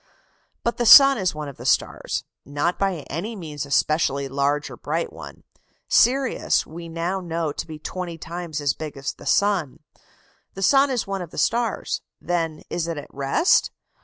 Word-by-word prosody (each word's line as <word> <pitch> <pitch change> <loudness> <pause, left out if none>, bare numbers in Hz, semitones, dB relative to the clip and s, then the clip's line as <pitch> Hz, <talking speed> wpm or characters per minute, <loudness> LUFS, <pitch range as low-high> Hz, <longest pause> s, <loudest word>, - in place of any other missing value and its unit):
But 235 - -1
the 240 - 0
sun 275 +1 +9
is 185 -4 0
one 150 -1 -5
of 140 - -9
the - - -9
stars - - 0 0.2
not 145 +5 -2
by 195 -5 0
any 195 +10 -4
means 150 -7 -6
a - - -14
specially 140 -2 +1
large 140 +2 0
or - - -8
bright 475 - -3
one; - - -11 0.4
Sirius 265 +2 +3
we 170 +1 -9
now 170 +3 -2
know 165 -3 -2
to - - -6
be 155 -1 -8
twenty 175 +2 -5
times 170 -2 -5
as 145 -2 +1
big 155 -2 -7
as 135 +1 -3
the - - -12
sun. 195 -9 +1 0.8
The 195 - -4
sun 275 +6 +5
is 250 -4 -1
one 195 -1 -3
of 175 - -7
the - - -13
stars: 230 +7 0 0.2
then 165 -3 -2
is 170 -1 -2
it 165 -2 -3
at 145 - -9
rest? 140 - +2
170 Hz, 185 wpm, -23 LUFS, 150-195 Hz, 0.8 s, sun